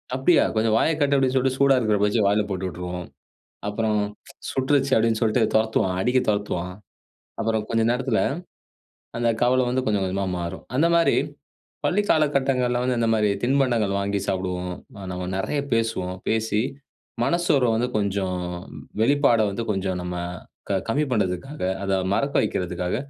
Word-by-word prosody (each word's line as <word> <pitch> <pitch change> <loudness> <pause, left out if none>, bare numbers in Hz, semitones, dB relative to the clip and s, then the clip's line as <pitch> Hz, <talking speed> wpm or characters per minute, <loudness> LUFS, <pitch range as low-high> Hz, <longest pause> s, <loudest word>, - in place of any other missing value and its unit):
"அப்டியா! 145 +6 +4
கொஞ்சம் 110 0 +2
வாய 160 - +3
காட்டு." 140 -1 +3
அப்டின்னு 135 -1 +1
சொல்லிட்டு 130 0 +1
சூடா 140 -1 +5
இருக்குற 110 -3 +1
பஜ்ஜிய 105 +1 +2
வாயில 105 +1 +3
போட்டு 95 -1 -2
விட்ருவோம். 90 0 -6 0.6
அப்பறம் 105 0 0 0.5
"சுட்டுருச்சு!" 135 0 +1
அப்டின்னு 115 0 +1
சொல்ட்டு 115 +1 +2
தொரத்துவான். 110 -4 +2
அடிக்க 125 +3 +3
தொரத்துவான். 90 -4 -1 0.7
அப்பறம் 110 -1 0
கொஞ்ச 115 0 +2
நேரத்துல, 125 -2 0 1.0
அந்த 120 -1 +1
கவலை 130 +1 +4
வந்து 130 +1 0
கொஞ்சம் 105 -2 +1
கொஞ்சமா 95 +1 -1
மாறும். 85 +2 -5
அந்த 160 +4 +4
மாரி 170 - +3 0.7
பள்ளிக் 205 +2 +1
காலகட்டங்கள்ல 135 -5 +2
வந்து, 125 -1 0
இந்த 115 - +2
மாரி 105 -1 +2
திண்பண்டங்கள் 120 -6 +2
வாங்கி 100 0 -1
சாப்டுவோம். 90 -1 -2 0.2
ஆ - - -9
நம்ம 90 0 -4
நெறையா 140 +9 -1
பேசுவோம். 105 -5 -1
பேசி 110 -1 +1 0.6
மனசோர்வ 150 -8 +2
வந்து 125 +2 0
கொஞ்சம் 95 -2 -1 0.6
வெளிப்பாட 140 -3 +4
வந்து 115 +4 -3
கொஞ்சம் 95 -2 -2
நம்ம 90 0 -4 0.5
க 95 - +2
கம்மி 145 +6 +1
பண்றதுக்காக, 105 +8 -2 0.2
அத 95 - -1 0.2
மறக்க 140 +4 -1
வக்கிறதுக்காக 90 +1 -2
110 Hz, 145 wpm, -24 LUFS, 95-130 Hz, 1.0 s, சூடா